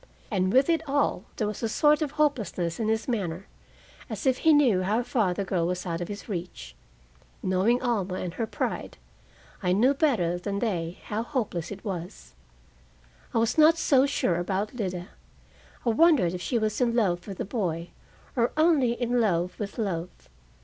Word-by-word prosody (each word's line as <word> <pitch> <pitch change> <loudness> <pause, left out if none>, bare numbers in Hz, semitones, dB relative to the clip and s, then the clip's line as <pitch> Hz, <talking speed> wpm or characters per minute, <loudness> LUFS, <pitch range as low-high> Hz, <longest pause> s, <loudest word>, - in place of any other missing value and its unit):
And 185 -2 +1
with 265 +4 +4
it 330 -2 +2
all, 275 -8 +1
there 215 - -1
was 210 -1 -4
a 225 - -1
sort 295 +6 +3
of 295 -2 -2
hopelessness 220 - 0
in 220 - 0
his 220 0 0
manner, 195 -7 -2 0.6
as - - -5
if 260 -1 +2
he 320 - +5
knew 260 -11 +4
how 210 +6 +1
far 220 -6 +1
the 185 +3 -2
girl 175 -3 0
was 180 0 -3
out 170 -1 -3
of 175 - -3
his 205 0 -7
reach. 170 - -6 0.7
Knowing 190 +7 +2
Alma 200 -7 0
and 180 -2 -4
her 225 +2 -2
pride, - - -3 0.6
I 180 -2 +1
knew 245 +8 +4
better 220 - +1
than 200 +2 -3
they 180 -6 -2
how 215 +1 -3
hopeless 230 - -3
it 200 +2 -8
was. 180 -3 -6 1.0
I - - -1
was 230 +6 +1
not 320 +2 +7
so 275 -4 +4
sure 180 -10 0
about 190 +5 -2
Lida. 185 -6 -4 0.8
I - - +3
wondered 260 - +4
if 180 - -5
she 235 +8 0
was 215 +1 -1
in 235 -1 +2
love 180 -6 +1
with 195 -2 -6
the - - -3
boy, 175 -6 -2 0.5
or 235 -2 +1
only 310 -7 +4
in 240 0 0
love 180 -4 0
with 205 -2 -5
love. 180 -6 -2
210 Hz, 185 wpm, -27 LUFS, 180-245 Hz, 1.0 s, not